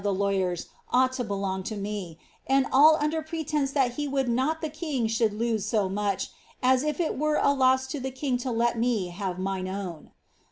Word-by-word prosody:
tne 200 -1 0
lawyers 190 -3 0 0.3
ought 255 +1 +3
to 255 - -2
belong 195 -3 -2
to 210 +3 -5
noe, 200 -4 -4 0.3
and 270 0 +3
all 305 +4 +7
under 310 +1 0
pretence 310 -3 -2
that 270 -4 +2
he 295 -1 -1
would 270 -2 0
not 260 +7 +1
the 315 - -2
king 300 -5 -2
should 225 0 +1
lose 220 0 -1
so 210 -4 +1
much, 200 0 -2 0.3
as 255 0 +4
if 300 +1 -2
it 325 -5 -1
were 305 0 +1
a 280 - +3
loss 260 -1 +3
to 265 +2 -5
the 265 +1 -3
king 260 0 -2
V> 255 - -3
let 235 0 +1
me 225 -6 +1
have 185 0 -4
mine 190 0 -2
own 185 -4 -6
245 Hz, 205 wpm, -27 LUFS, 200-275 Hz, 0.3 s, all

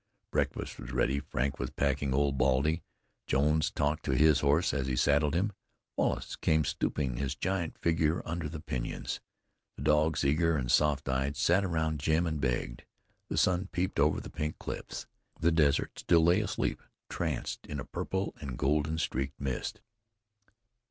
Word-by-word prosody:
Breakfast - - -1
was - - -7
ready; 65 +2 +1
Frank 70 -1 -2
was - - -2
packing 70 -1 0
Old 70 +1 +2
Baldy; 70 +5 +2 0.5
Jones 75 +3 +2
talked 75 +2 -1
to 65 - +1
his 75 +1 +5
horse 75 +5 +2
as 70 -2 -1
he 65 - 0
saddled 70 +4 +3
him; 100 +5 +1 0.4
Wallace - - -1
came 80 -1 +2
stooping 65 -2 -1
his 70 +1 -2
giant 95 -2 -2
figure 80 0 +1
under 85 -2 -3
the 80 0 -6
pinyons; 65 -6 -3 0.6
the 70 - -6
dogs, 75 0 +3
eager 80 +3 +3
and 60 -3 -1
soft 75 -1 +3
eyed, 65 +2 0
sat 90 +7 +3
around 80 -4 0
Jim 80 +4 +2
and 80 -3 -2
begged. - - -1 0.5
The - - -2
sun 90 +1 +2
peeped 90 -3 -1
over 75 +2 +3
the - - -9
Pink 75 +1 -3
Cliffs; - - -6 0.3
the 85 +1 +3
desert 75 -4 +2
still 85 -2 +4
lay 85 +5 +4
asleep, 105 - -2 0.3
tranced - - -3
in 75 - -4
a - - -5
purple 95 +1 -3
and 65 -5 -5
golden 75 +3 +1
streaked 70 -3 -2
mist. 65 -2 -3
75 Hz, 165 wpm, -31 LUFS, 70-80 Hz, 0.6 s, his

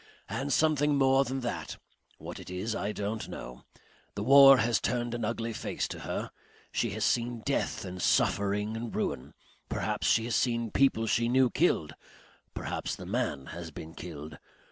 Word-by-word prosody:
And 140 +2 -3
something 150 0 +3
more 135 0 +4
than 135 +1 -3
that. 120 - -4 0.4
What - - -8
it - - -10
is 95 +5 -3
I 100 - -2
don't 105 +1 -4
know. 60 +1 -9 0.5
The 100 - -3
war 135 +2 +9
has 115 0 +2
turned 120 0 -1
an 120 -1 -3
ugly 115 +1 -2
face - - -3
to - - -6
her. - - -4 0.4
She 115 - 0
has 110 - 0
seen 120 -1 0
death - - -1
and 90 0 -6
suffering 105 +4 +1
and 115 0 -5
ruin. 70 +4 -3 0.3
Perhaps - - -1
she 110 - +3
has 120 - -1
seen 115 -3 0
people 130 -5 +3
she 115 +1 +1
knew 130 0 +4
killed. 130 - +1 0.6
Perhaps - - -3
the - - -9
man 70 -2 -2
has 85 -1 -7
been 80 +1 -9
killed. 80 -3 -8
115 Hz, 170 wpm, -29 LUFS, 100-125 Hz, 0.6 s, war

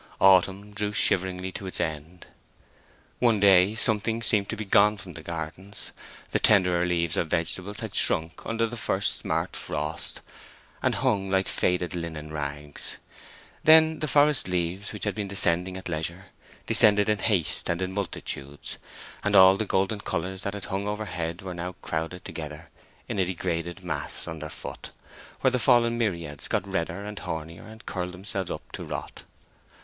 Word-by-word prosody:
Autumn 95 +2 +4
drew 105 0 -1
shiveringly 95 -1 +1
to 95 - -6
its 95 - -4
end. 80 +3 -4 0.9
One 115 -4 +4
day 100 +1 +6
something 110 +1 +1
seemed 105 -5 +2
to - - -2
be 110 - -4
gone 105 +2 +5
from 95 -3 -9
the 80 - -9
gardens; 85 +5 -6 0.4
the - - +2
tenderer 90 -4 +4
leaves 85 -2 0
of 85 - +1
vegetables 90 +6 -2
had 110 -3 -5
shrunk 80 +1 0
under 115 0 0
the 120 +1 -5
first 100 -2 0
smart - - -1
frost, - - -4 0.6
and - - +2
hung 95 -2 +1
like 95 0 +2
faded 90 -2 0
linen 80 -3 -5
rags; 75 0 -4 0.7
then 160 0 +7
the 155 - -1
forest 145 -3 +3
leaves, 90 +2 -2
which 105 - -7
had 105 - 0
been 105 -2 -3
descending 90 -1 +1
at 95 - -7
leisure, 85 +3 -4 0.4
descended 105 0 +5
in 105 -1 +2
haste 95 -8 0
and 85 - 0
in 95 0 -2
multitudes, 75 -7 -5 0.5
and 100 0 +2
all 95 0 +9
the 110 - -1
golden 95 +3 +1
colors 95 +2 -3
that 100 0 -3
had 100 - -6
hung 100 +2 -2
overhead 90 -5 -3
were 95 -1 -5
now 90 +1 -4
crowded 80 +3 -3
together 75 -1 -7 0.4
in - - -2
a 95 - +3
degraded 85 -1 -3
mass - - -1
underfoot, 80 -2 -7 0.5
where 130 - +4
the 125 - +1
fallen 115 0 +4
myriads 85 -11 -2
got 100 - -1
redder 95 +2 -2
and 105 0 -6
hornier, 80 0 -6
and 110 0 -13
curled 90 -1 -3
themselves 95 0 -4
up - - -6
to - - -6
rot. - - -6
95 Hz, 165 wpm, -27 LUFS, 85-105 Hz, 0.9 s, all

